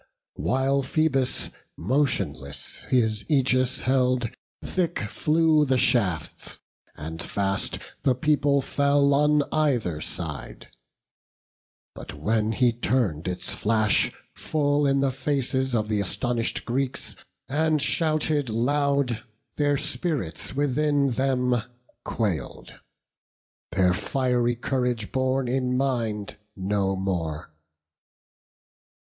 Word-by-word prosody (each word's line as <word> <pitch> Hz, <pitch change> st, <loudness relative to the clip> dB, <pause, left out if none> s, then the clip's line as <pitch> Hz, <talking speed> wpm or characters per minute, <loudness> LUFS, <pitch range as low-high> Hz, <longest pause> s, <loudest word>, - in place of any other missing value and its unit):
While 135 Hz, -, +1 dB
Phoebus 135 Hz, -2 st, 0 dB, 0.3 s
motionless 85 Hz, -, -2 dB
his 110 Hz, -4 st, +2 dB
Ægis 130 Hz, -3 st, +1 dB
held, 125 Hz, -2 st, +2 dB, 0.3 s
Thick 175 Hz, -2 st, -1 dB
flew 155 Hz, +7 st, +3 dB
the 135 Hz, -2 st, +2 dB
shafts, 95 Hz, -, 0 dB, 0.4 s
and 80 Hz, +2 st, -6 dB
fast 95 Hz, -1 st, -2 dB, 0.2 s
the 130 Hz, -, +3 dB
people 140 Hz, 0 st, +2 dB
fell 140 Hz, +1 st, +3 dB
On 150 Hz, +1 st, +4 dB
either 120 Hz, -, +1 dB
side; -, -, -7 dB, 1.2 s
but -, -, -9 dB
when 110 Hz, +8 st, 0 dB
he 120 Hz, +1 st, +3 dB
turn'd 115 Hz, -, 0 dB
its 90 Hz, 0 st, -4 dB
flash 110 Hz, -1 st, +2 dB, 0.2 s
Full 145 Hz, -1 st, +1 dB
in 135 Hz, 0 st, +2 dB
the 135 Hz, -1 st, +2 dB
faces 130 Hz, -1 st, -1 dB
of 110 Hz, -2 st, 0 dB
the 105 Hz, -1 st, 0 dB
astonish'd 115 Hz, +4 st, -2 dB
Greeks, 130 Hz, +2 st, -2 dB, 0.3 s
And 155 Hz, +3 st, +1 dB
shouted 155 Hz, -2 st, 0 dB
loud, 140 Hz, +1 st, +1 dB, 0.4 s
their 145 Hz, -1 st, +2 dB
spirits 145 Hz, -, -3 dB
within 145 Hz, 0 st, +2 dB
them 125 Hz, -1 st, +1 dB, 0.4 s
quail'd, 95 Hz, -, -3 dB, 0.9 s
Their 90 Hz, -1 st, +3 dB
fiery 125 Hz, +3 st, 0 dB
courage 125 Hz, -3 st, -1 dB
borne 130 Hz, 0 st, +1 dB
in 125 Hz, 0 st, 0 dB
mind 115 Hz, -6 st, -1 dB, 0.2 s
no 95 Hz, 0 st, 0 dB
more. 85 Hz, -5 st, -3 dB
130 Hz, 100 wpm, -25 LUFS, 110-140 Hz, 1.2 s, On